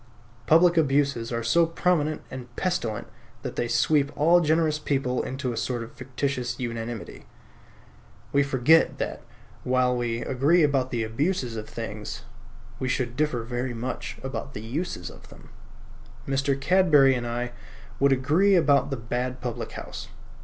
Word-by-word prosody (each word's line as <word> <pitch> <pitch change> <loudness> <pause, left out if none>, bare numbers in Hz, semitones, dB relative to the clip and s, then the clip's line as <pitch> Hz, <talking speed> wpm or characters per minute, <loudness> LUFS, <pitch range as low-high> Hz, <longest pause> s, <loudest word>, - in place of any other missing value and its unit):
Public 170 +2 +5
abuses 140 -6 +2
are 115 -1 -2
so 165 +9 +4
prominent 165 -3 0
and 130 -2 -7
pestilent 120 - -2 0.4
that 125 - -5
they 120 - -1
sweep 140 +4 +2
all 170 +4 +5
generous 155 -1 +2
people 135 -4 0
into 130 -1 -3
a - - -6
sort 120 0 -2
of 115 - -10
fictitious 130 -1 -3
unanimity. 115 -2 -5 1.1
We 140 - +5
forget 140 +3 +4
that, - - -4 0.4
while 125 0 +2
we 120 -1 -2
agree 150 +7 +3
about 135 -3 +2
the 120 -3 -1
abuses 125 +2 -1
of 110 -1 -6
things, 110 -2 -6 0.6
we 130 - -2
should 125 -2 -1
differ 145 -5 0
very 120 +1 -3
much 125 +3 -5
about 135 +1 -5
the 105 - -6
uses 120 - -4
of - - -16
them. - - -15 0.8
Mr. 135 0 0
Cadbury 150 -4 +5
and 120 -2 -2
I 120 +1 -3 0.5
would 140 0 +4
agree 155 +10 +3
about 145 -5 +4
the 135 - -2
bad 125 +2 -3
public 120 -1 -5
house. - - -7
130 Hz, 150 wpm, -26 LUFS, 120-150 Hz, 1.1 s, Public